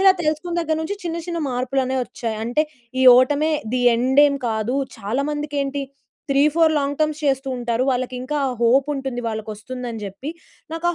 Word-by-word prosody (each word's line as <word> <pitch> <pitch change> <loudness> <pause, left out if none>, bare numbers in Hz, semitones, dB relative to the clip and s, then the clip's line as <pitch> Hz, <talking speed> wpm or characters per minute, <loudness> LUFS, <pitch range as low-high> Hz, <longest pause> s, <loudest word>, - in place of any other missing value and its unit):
ఇలా 385 0 +7
తెలుసుకున్న 310 +2 -1
దగ్గర 320 -1 0
నుంచి, 405 +6 -3
చిన్న 335 -1 -2
చిన్న 340 -1 -3
మార్పులనేవి 260 +1 0
వచ్చాయి. 230 -2 -5
అంటే, 245 +7 +1 0.4
ఈ - - +4
ఓటమే 290 +5 +2 0.2
ది 255 - +1
ఎండ్ 260 +4 +3
ఏమి 280 -1 -1
కాదు. 220 +2 -1 0.2
చాలా 220 +6 -1
మందికేంటి, 285 -2 -2 0.5
త్రీ 275 +1 +4
ఫోర్ 325 0 +4
లాంగ్ 285 -1 0
టర్మ్స్ 310 -1 +1
చేస్తూంటారు. 255 -4 0
వాళ్ళకి 255 0 -1
ఇంకా 295 +4 -3 0.2
హోప్ 255 +4 +4
ఉంటుంది. 265 -3 -3
వాళ్ళకొస్తుందని 225 +2 -5
జెప్పి, 200 +9 -6 0.4
నాకు 330 +1 -3
ఆ - - -7
270 Hz, 165 wpm, -22 LUFS, 245-300 Hz, 0.5 s, ఇలా